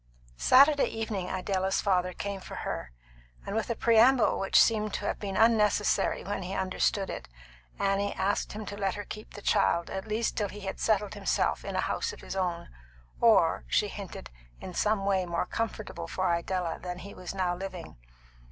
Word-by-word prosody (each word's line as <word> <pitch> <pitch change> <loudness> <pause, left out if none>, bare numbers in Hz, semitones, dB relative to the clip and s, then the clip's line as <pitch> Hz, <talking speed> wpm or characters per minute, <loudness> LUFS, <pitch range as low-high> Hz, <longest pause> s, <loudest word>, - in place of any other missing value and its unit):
Saturday 280 - +6
evening 215 -5 -3
Idella's 190 0 0
father 185 -2 +1
came 200 +1 -4
for - - -9
her; - - -4 0.5
and 200 - -4
with 225 +1 -1
a 235 - 0
preamble 235 +3 +4
which 195 - +4
seemed 215 -2 +3
to - - -4
have - - -2
been 195 -2 -4
unnecessary 210 -3 +3
when 200 0 -3
he 185 +1 -4
understood 190 +1 0
it, - - -6 0.5
Annie 200 +1 +1
asked 200 +2 -1
him 215 +1 -6
to 200 - -6
let 195 -2 -1
her 205 -1 -6
keep 215 +2 -9
the 205 - -9
child, 170 -4 +2
at 190 +2 -5
least 220 +2 -1
till 205 -2 -1
he 210 - -9
had 190 -1 -5
settled 210 -2 +1
himself - - 0
in - - -5
a - - +1
house 460 0 -2
of - - -12
his - - -6
own, 180 -3 -2 0.5
or, - - +4
she - - +2
hinted, - - -8 0.3
in 185 - -8
some 210 +1 +1
way 190 -2 +1
more 170 0 -1
comfortable 215 -6 -4
for 185 0 0
Idella 170 0 -2
than 180 -1 -5
he 195 +3 -9
was 185 +1 -7
now 180 -2 0
living. 185 -3 -7
195 Hz, 190 wpm, -29 LUFS, 185-215 Hz, 0.5 s, Saturday